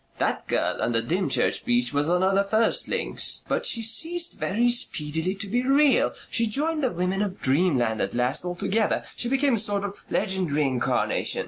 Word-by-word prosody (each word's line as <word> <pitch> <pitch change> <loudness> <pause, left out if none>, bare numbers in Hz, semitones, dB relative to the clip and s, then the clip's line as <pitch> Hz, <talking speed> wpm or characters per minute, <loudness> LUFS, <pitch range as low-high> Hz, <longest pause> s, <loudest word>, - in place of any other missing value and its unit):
That - - -2
girl - - -1
on 120 - 0
the 115 0 +1
Dymchurch 180 +9 0
beach 245 - +1
was 145 +2 0
one 180 +1 +1
of 190 +1 +2
the 200 +1 +3
first 220 +3 +1
links, - - 0
but - - -1
she 230 - +1
ceased 335 +10 +1
very 235 +5 +1
speedily 160 -5 -1
to 200 +2 -5
be 240 +5 0
real 275 +1 +3 0.2
she 230 - +3
joined 305 +7 -1
the 260 - +2
women 180 +2 -2
of 200 -2 -3
dreamland 130 -6 +1
at 100 +3 -3
last 125 +5 0
altogether. 190 +5 -1
She 240 - +1
became 270 0 +1
a 225 - +1
sort 205 -1 0
of 200 0 -7
legendary 185 -7 0
incarnation. 130 -3 0
200 Hz, 190 wpm, -24 LUFS, 160-240 Hz, 0.2 s, the